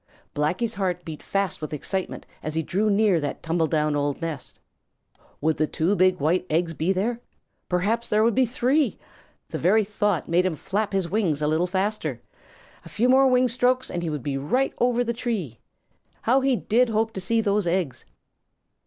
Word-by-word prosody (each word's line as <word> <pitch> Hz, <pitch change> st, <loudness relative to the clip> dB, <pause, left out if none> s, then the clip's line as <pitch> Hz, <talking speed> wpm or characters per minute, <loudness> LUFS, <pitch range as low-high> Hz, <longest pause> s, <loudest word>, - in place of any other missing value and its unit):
Blacky's 180 Hz, +10 st, -1 dB
heart 180 Hz, -4 st, -2 dB
beat 155 Hz, -3 st, -7 dB
fast 195 Hz, -2 st, -2 dB
with 155 Hz, 0 st, -5 dB
excitement 185 Hz, +6 st, -4 dB, 0.2 s
as 155 Hz, 0 st, -5 dB
he 160 Hz, -, 0 dB
drew 205 Hz, +7 st, 0 dB
near 200 Hz, -3 st, +3 dB
that 145 Hz, -2 st, -3 dB
old -, -, -32 dB
tumble 165 Hz, 0 st, +1 dB
down 150 Hz, -1 st, +1 dB, 0.3 s
nest. 165 Hz, -5 st, -6 dB, 0.8 s
Would 160 Hz, +1 st, +1 dB
those 155 Hz, -, 0 dB
two 175 Hz, +6 st, +1 dB
big 185 Hz, -1 st, +3 dB
white 165 Hz, +5 st, +1 dB
eggs 165 Hz, +1 st, 0 dB
be 160 Hz, +4 st, 0 dB
there? 225 Hz, +6 st, -1 dB, 0.5 s
Perhaps 215 Hz, +6 st, 0 dB
there 215 Hz, +1 st, +3 dB
would 230 Hz, 0 st, +3 dB
be 260 Hz, +1 st, +3 dB
three! 260 Hz, +5 st, +1 dB, 0.5 s
The -, -, -4 dB
very 215 Hz, +5 st, +4 dB
thought 205 Hz, -3 st, -1 dB
made 175 Hz, +2 st, +3 dB
him 175 Hz, -, -2 dB
flap 205 Hz, +7 st, -2 dB
his 195 Hz, -3 st, 0 dB
wings 175 Hz, -6 st, 0 dB
a 150 Hz, -, 0 dB
little 160 Hz, +4 st, +1 dB
faster. 190 Hz, -, -2 dB, 0.6 s
A -, -, -12 dB
few 215 Hz, +10 st, +1 dB
more 265 Hz, +1 st, +6 dB
wing 255 Hz, 0 st, +4 dB
strokes 250 Hz, +2 st, +1 dB
and 175 Hz, -, -3 dB
he 170 Hz, -, -2 dB
would 150 Hz, -4 st, -4 dB
be 135 Hz, -2 st, -2 dB
right 250 Hz, -, 0 dB
over 245 Hz, 0 st, +2 dB
the 235 Hz, 0 st, -2 dB
tree. 210 Hz, -, -3 dB, 0.6 s
How 255 Hz, +4 st, +3 dB
he 265 Hz, -1 st, +2 dB
did 235 Hz, +2 st, +2 dB
hope 220 Hz, 0 st, 0 dB
to 190 Hz, -, -5 dB
see 225 Hz, +5 st, +1 dB
those 205 Hz, -3 st, +1 dB
eggs! 170 Hz, -6 st, -1 dB
190 Hz, 190 wpm, -24 LUFS, 165-230 Hz, 0.8 s, more